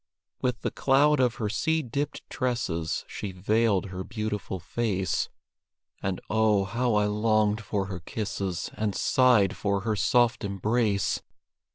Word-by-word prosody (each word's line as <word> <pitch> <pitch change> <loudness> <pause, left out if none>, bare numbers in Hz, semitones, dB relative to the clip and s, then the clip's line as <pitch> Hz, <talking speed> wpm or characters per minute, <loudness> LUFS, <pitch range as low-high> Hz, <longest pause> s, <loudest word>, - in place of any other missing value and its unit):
With 125 -1 -1
the - - -1
cloud 145 +2 +3
of 125 -2 +2
her 110 - -2
sea 160 +9 0
dipped 140 +4 -4
tresses 90 -11 -2
She 100 - -5
veiled 100 +1 +1
her 95 0 -4
beautiful 105 -3 -4
face 95 -2 -1 0.7
And, 95 -2 -2
oh, 110 -2 +3
how 115 +3 0
I 105 0 +3
longed 105 0 +2
for 100 -2 -2
her 95 -2 -5
kisses, 95 -1 -3
And 105 -2 -2
sighed 120 -7 +4
for 100 -1 0
her 110 +1 0
soft 120 +3 +2
embrace! 100 +1 0
105 Hz, 140 wpm, -27 LUFS, 100-120 Hz, 0.7 s, sighed